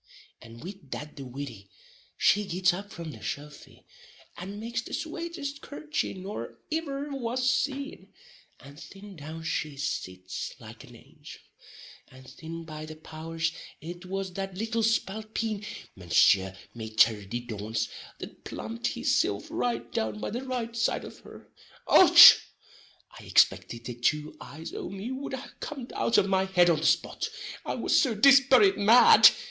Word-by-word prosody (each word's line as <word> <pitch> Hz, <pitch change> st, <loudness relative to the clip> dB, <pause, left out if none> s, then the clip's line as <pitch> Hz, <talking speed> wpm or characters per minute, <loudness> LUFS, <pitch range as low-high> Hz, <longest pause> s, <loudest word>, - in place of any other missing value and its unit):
And 115 Hz, +3 st, -13 dB
wid 190 Hz, -5 st, -10 dB
that 150 Hz, +3 st, -7 dB
the 140 Hz, -, -8 dB
widdy, 125 Hz, -6 st, -8 dB, 0.5 s
she 210 Hz, -, +3 dB
gits 180 Hz, 0 st, +2 dB
up 200 Hz, +3 st, -7 dB
from 170 Hz, -2 st, -7 dB
the 115 Hz, -, -11 dB
sofy, 145 Hz, +7 st, -8 dB, 0.5 s
and 195 Hz, +3 st, -7 dB
makes 230 Hz, +1 st, -3 dB
the -, -, -10 dB
swatest 315 Hz, -3 st, -5 dB
curthchy 305 Hz, -4 st, -4 dB
nor 185 Hz, -, -7 dB, 0.2 s
iver 290 Hz, -3 st, -3 dB
was 255 Hz, -1 st, -2 dB
seen; 275 Hz, +3 st, -2 dB, 0.5 s
and 140 Hz, +2 st, -14 dB
thin 200 Hz, +2 st, -12 dB
down 160 Hz, +1 st, -8 dB
she 155 Hz, -3 st, -3 dB
sits 95 Hz, -9 st, -5 dB
like -, -, -12 dB
an -, -, -15 dB
angel; -, -, -14 dB, 0.7 s
and 130 Hz, 0 st, -16 dB
thin, 165 Hz, +3 st, -9 dB
by 155 Hz, -1 st, -8 dB
the 155 Hz, -, -9 dB
powers, 160 Hz, +1 st, -4 dB, 0.3 s
it 175 Hz, +3 st, -9 dB
was 195 Hz, 0 st, -4 dB
that 195 Hz, 0 st, -5 dB
little 225 Hz, +2 st, -1 dB
spalpeen 220 Hz, 0 st, -1 dB, 0.3 s
Mounseer 95 Hz, +2 st, +3 dB, 0.2 s
Maiter 110 Hz, -2 st, +2 dB
di 120 Hz, +3 st, -3 dB
dauns 110 Hz, -1 st, -3 dB, 0.3 s
that -, -, -10 dB
plumped 115 Hz, +2 st, -5 dB
his -, -, -1 dB
silf 100 Hz, -, -1 dB
right 120 Hz, -1 st, -2 dB
down 110 Hz, -1 st, -2 dB
by -, -, -4 dB
the 245 Hz, +4 st, -4 dB
right 245 Hz, -3 st, -4 dB
side 230 Hz, -, 0 dB
of -, -, -11 dB
her. -, -, -14 dB, 0.4 s
Och -, -, +7 dB
hon! -, -, +13 dB, 0.8 s
I -, -, -13 dB
ixpicted 115 Hz, 0 st, +2 dB
the 125 Hz, -, -5 dB
two 150 Hz, +6 st, -1 dB
eyes 160 Hz, +3 st, -9 dB
o' -, -, -5 dB
me 195 Hz, +5 st, -6 dB
wud 265 Hz, +1 st, -5 dB
ha 265 Hz, +2 st, -9 dB
cum'd 270 Hz, -5 st, -7 dB
out 230 Hz, -, +1 dB
of 190 Hz, -, +3 dB
my 190 Hz, -1 st, +2 dB
head 180 Hz, -2 st, +4 dB
on 160 Hz, -, +1 dB
the 160 Hz, -, +1 dB
spot, -, -, 0 dB, 0.3 s
I -, -, -3 dB
was -, -, +2 dB
so 250 Hz, -6 st, 0 dB
dispirate 265 Hz, -5 st, +6 dB
mad! 225 Hz, +4 st, +8 dB
180 Hz, 160 wpm, -28 LUFS, -, 0.8 s, hon